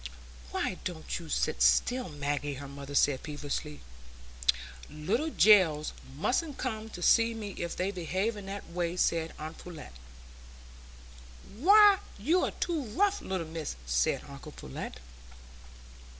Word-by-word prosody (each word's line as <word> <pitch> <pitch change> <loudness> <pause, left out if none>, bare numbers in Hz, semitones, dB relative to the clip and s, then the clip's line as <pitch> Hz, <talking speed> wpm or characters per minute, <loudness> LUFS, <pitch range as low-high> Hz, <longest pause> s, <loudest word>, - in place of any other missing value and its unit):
"Why - - -2
don't 170 -1 -4
you 165 -2 -10
sit - - 0
still, 250 -4 +3
Maggie?" 145 -1 -2
her 140 +1 -7
mother 140 +1 -8
said 140 -2 +3
peevishly. 145 - -5 1.1
"Little 205 - -1
gells 180 - +5 0.2
mustn't 275 - 0
come 220 -3 -3
to 175 -4 -7
see 230 +4 +4
me 210 -2 -5
if 170 -2 -4
they 185 +2 -1
behave 190 +4 -1
in 200 -2 -8
that 200 0 -6
way," 175 0 -2
said 165 -2 +1
aunt 155 +1 -7
Pullet. 165 - -10 1.6
"Why, 400 - +7 0.2
you're 320 - +2
too 335 -3 -2
rough, 395 - +1
little 185 -3 -3
miss," 160 -1 -5
said - - +1
uncle - - -10
Pullet. 65 - -7
180 Hz, 130 wpm, -30 LUFS, 150-230 Hz, 1.6 s, Why